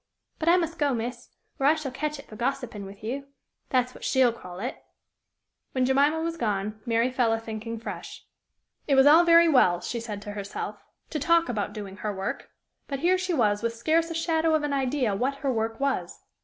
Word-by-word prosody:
But 330 - +1
I 350 - +6
must 335 -1 -2
go, 285 -3 +2
miss, 240 +2 -5 0.3
or 275 - +3
I 305 - +6
shall 305 -4 -4
catch 300 +3 -3
it 275 - -11
for 215 - -12
gossiping 240 -4 -3
with 195 +2 -13
you 270 +5 -4 0.4
that's 255 -1 +1
what - - -13
she'll 260 -3 +3
call 180 -5 -10
it." 245 +6 -5 0.9
When 255 -1 +2
Jemima 285 +5 +3
was 330 0 -2
gone, 210 -2 -2
Mary 230 +2 +2
fell 245 -3 +2
a 225 - 0
thinking 225 0 -6
afresh. 230 - -8 0.6
It 280 - +3
was 265 0 +6
all 315 +4 +8
very 335 0 +7
well, 215 - +4
she 235 +6 -4
said 220 -3 -5
to 205 - -6
herself, 200 -1 -5 0.3
to 310 - -2
talk 335 +3 +3
about 215 -4 -2
doing 200 -2 -7
her 210 +2 -3
work, 195 +7 -4 0.4
but 275 -1 -4
here 365 +2 +3
she 365 -2 -1
was 210 -6 +2
with 230 0 -1
scarce 320 +8 +1
a 330 - -4
shadow 325 -1 +2
of 310 - 0
an 290 -1 -1
idea 265 -4 0
what 260 +7 0
her 265 - +2
work 225 0 -2
was! 275 -1 -2
255 Hz, 210 wpm, -26 LUFS, 225-305 Hz, 0.9 s, all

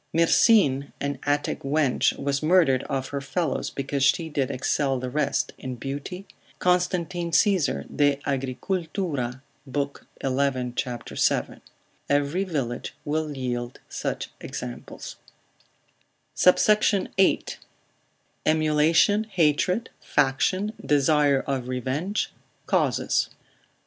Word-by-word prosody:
Myrsine, 165 - +4
an 140 -1 -3
Attic 145 0 0
wench, 140 -1 +1
was 140 0 -1
murdered 155 -5 +4
of 135 -1 -3
her 140 -1 -3
fellows, 155 +1 -2
because 140 0 -3
she 160 +4 +2
did 140 -3 -1
excel 135 0 0
the 125 0 -4
rest 150 +2 0
in 130 -1 -5
beauty, 145 +10 -6 0.3
Constantine, 180 -1 0
Agricult. 145 - 0
l. 135 -9 -2 0.8
11. 130 -2 0
c. 125 -1 -2 0.2
7. - - 0 0.5
Every 145 +6 +1
village 135 -10 -3
will 150 -1 -2
yield 120 -1 -3
such - - -4
examples. - - -7 1.2
SUBSECT. 200 +2 +4
VIII.—Emulation, 160 0 +1
Hatred, 180 +2 +1
Faction, 165 +9 +1
Desire 145 -1 +3
of 135 -3 -3
Revenge, 130 - -2 0.3
Causes. - - +1
145 Hz, 95 wpm, -25 LUFS, 135-175 Hz, 1.2 s, Myrsine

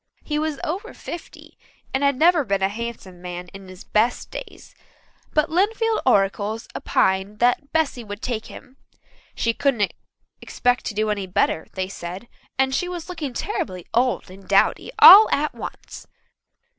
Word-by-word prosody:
He 300 -1 -2
was 310 -2 -2
over 390 +9 -4
fifty, 340 - -10 0.3
and 265 - 0
had 280 -1 +3
never 330 +1 +4
been 200 -4 -1
a 190 - +3
handsome 210 -5 -7
man 180 0 -7
in 195 +1 -12
his 185 0 -12
best 230 +3 0
days, - - -9 0.6
but 305 +1 +2
Lynnfield 440 +5 +1
oracles 205 0 +1
opined 190 +2 0
that 245 +5 +1
Bessy 315 -6 0
would 205 -1 -8
take 230 -3 -3
him. 260 - -13 0.6
She 230 - 0
couldn't 230 -7 0 0.5
expect 245 0 0
to 210 - -4
do 215 0 0
any 200 -2 -3
better, 180 -3 0
they 185 -1 -3
said, 185 +3 -8 0.3
and 265 0 +2
she 360 +6 -1
was 350 -1 -6
looking 310 -7 -5
terribly 320 - -4
old 240 -4 0
and 190 +1 -14
dowdy - - +2
all 420 +3 +10
at 300 +1 0
once. - - -9
240 Hz, 155 wpm, -22 LUFS, 195-305 Hz, 0.6 s, all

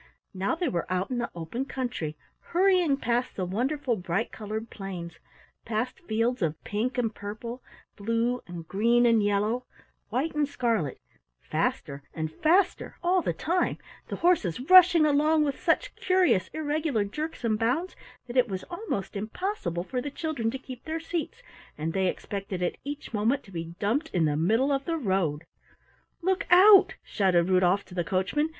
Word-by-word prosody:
Now 190 - -1
they 345 +1 -1
were 175 -6 -2
out 185 +5 -1
in 250 - -1
the 235 - -2
open 175 +11 -4
country 240 - -4 0.2
hurrying 360 -5 +2
past 245 0 -1
the 185 - -2
wonderful 250 +6 -1
bright 185 +3 -2
colored 220 +1 -5
plains, 180 -4 -7 0.4
past 230 - -2
fields 240 - -1
of 160 -3 +1
pink 230 +6 -2
and 230 -3 0
purple, 220 +5 -7 0.3
blue 230 +4 0
and 170 -2 -8
green 235 +4 +3
and 230 -3 +4
yellow, 210 +5 0 0.4
white 280 +6 -1
and 300 -1 +1
scarlet, 230 - -1 0.4
faster 140 0 -2
and 160 -1 -3
faster 350 - +2
all 360 +1 +3
the - - 0
time, 350 +2 0 0.3
the - - -4
horses 315 - +2
rushing 360 -3 +8
along 305 +1 +3
with 285 -2 -2
such - - +1
curious 365 - +2
irregular 300 -6 -1
jerks 300 +8 -5
and 220 -2 +1
bounds 270 +11 0 0.3
that 245 0 -5
it 250 -1 +5
was 190 -3 -4
almost 345 - -4
impossible 210 - -3
for 250 +6 -3
the 290 - -4
children 285 -6 -2
to 260 - -3
keep 255 -2 -10
their 320 0 -3
seats, 345 - -4 0.3
and 160 +2 -3
they 190 -1 +1
expected 195 -1 -4
at 175 - -1
each 285 -2 -6
moment 225 +6 +1
to 195 - -16
be 165 -1 -6
dumped 255 +12 0
in 170 -3 +3
the 150 -1 +1
middle 225 - +2
of 275 0 0
the 330 -1 -1
road. 185 - 0 0.8
"Look 380 +2 0
out!" 385 +1 +8
shouted 185 -4 +2
Rudolf 185 +1 +3
to - - -14
the 175 -1 -1
coachman. 195 - 0
235 Hz, 170 wpm, -27 LUFS, 190-305 Hz, 0.8 s, rushing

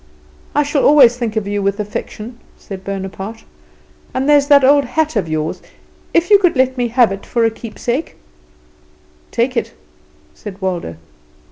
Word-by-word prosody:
"I 295 - +3
shall 285 -1 0
always 270 -5 +6
think 235 -3 -3
of 215 -2 -2
you 205 0 -2
with 200 +1 -1
affection" 210 +3 -6 0.2
said 190 -2 -9
Bonaparte. 195 +3 -6 0.7
"And 265 +2 0
there's 290 -1 +4
that 285 -2 +6
old 285 +2 +5
hat 305 +3 -1
of 195 -6 -1
yours, 155 0 -3 0.5
if 335 +5 +1
you 405 - +8
could 355 -5 +2
let 260 0 +2
me 245 -2 0
have 235 -2 +3
it 195 0 -6
for 235 -2 0
a 225 - +2
keepsake 235 +5 -4 0.6
" - - -34
"Take 250 +2 +1
it," 235 - -2 0.6
said 195 - -10
Waldo. 180 - -3
235 Hz, 165 wpm, -17 LUFS, 200-280 Hz, 0.7 s, you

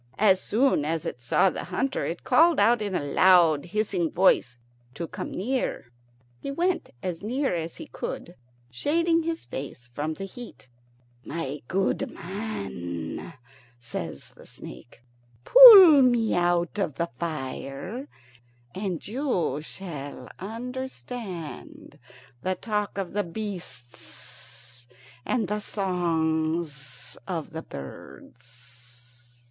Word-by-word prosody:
As 190 -3 +4
soon 240 - +2
as 160 +1 -2
it 120 - -5
saw 150 +9 +3
the - - -5
hunter 270 0 -1
it 170 - -5
called 335 0 +5
out, 225 +3 +4
in 200 -3 -2
a 150 - -1
loud 170 -1 +5
hissing 190 -3 -1
voice, 145 -10 +3 0.4
to 170 - -4
come - - -6
near. 225 - -2 0.5
He - - -6
went 345 +6 0
as 180 -3 -3
near 255 +3 -1
as 165 -1 -3
he - - -8
could, 175 - -6 0.4
shading 330 - +1
his 330 0 -3
face 125 -3 -7
from 155 +4 -3
the 195 - -6
heat. 240 - -11 0.6
"My 150 -3 -4
good 195 +1 0
man," 100 - -6 0.5
says 85 - -7
the - - -17
snake, 120 - -12 0.4
"pull 395 - +11
me 240 -3 +3
out 175 +2 +1
of 155 -8 -1
the 170 -2 -2
fire, 160 - -5 0.7
and 190 -4 -4
you 200 - -1
shall 155 -4 -8
understand 230 - -7 0.4
the 185 +4 -1
talk 210 -2 -3
of 195 -3 -3
the 205 0 0
beasts 165 - -9 0.4
and 235 -6 0
the 210 +2 -1
songs 160 - -2
of 165 -5 -4
the 160 0 -5
birds." 120 - -13
175 Hz, 120 wpm, -26 LUFS, 145-220 Hz, 0.7 s, pull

